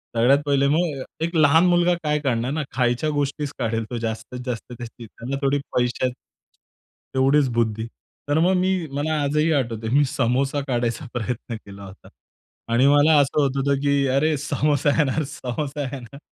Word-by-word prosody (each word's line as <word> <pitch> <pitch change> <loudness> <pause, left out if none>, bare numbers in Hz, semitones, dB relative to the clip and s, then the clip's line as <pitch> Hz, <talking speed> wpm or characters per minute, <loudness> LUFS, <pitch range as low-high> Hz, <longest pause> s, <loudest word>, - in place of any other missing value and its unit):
सगळ्यात 125 +5 +4
पहिले 140 -1 +2
मग 160 -5 -1 0.2
एक 170 +1 -5
लहान 160 +2 +5
मुलगा 175 0 +3
काय 150 0 +1
काढणार 125 -3 -1
ना 150 +1 -2
खायच्या 125 +4 +1
गोष्टीचं 145 0 -2
काढेल 115 0 -1
तो 120 - -2
जास्तीत 115 +3 -5
जास्त 125 0 -5
त्याची 120 0 -9
त्याला 120 +5 -6
थोडी 140 +1 +1 0.2
पैशाचं 125 +1 0 1.0
तेवढीच 135 +1 +3
बुद्धी 110 -1 -1 0.4
तर 145 +2 +2
मग 180 +3 +3
मी 185 +1 +1 0.2
मला 150 +2 -1
आजही 150 +3 +1
आठवतंय 115 -5 -2
मी 145 - +5
समोसा 135 +4 0
काढायचा 120 +3 -1
प्रयत्न 120 0 -4
केला 100 0 -11
होता. 95 +1 -14 0.6
आणि 125 +4 +4
मला 145 +2 +5
असं 145 +1 +2
होत 140 -1 0
होतं 140 0 +1
की 140 -1 +2
अरे! 145 +4 +2
समोसा 145 0 0
येणार, 150 +1 +1
समोसा 145 +1 -5
येणार. 135 0 -9
140 Hz, 160 wpm, -23 LUFS, 120-150 Hz, 1.0 s, लहान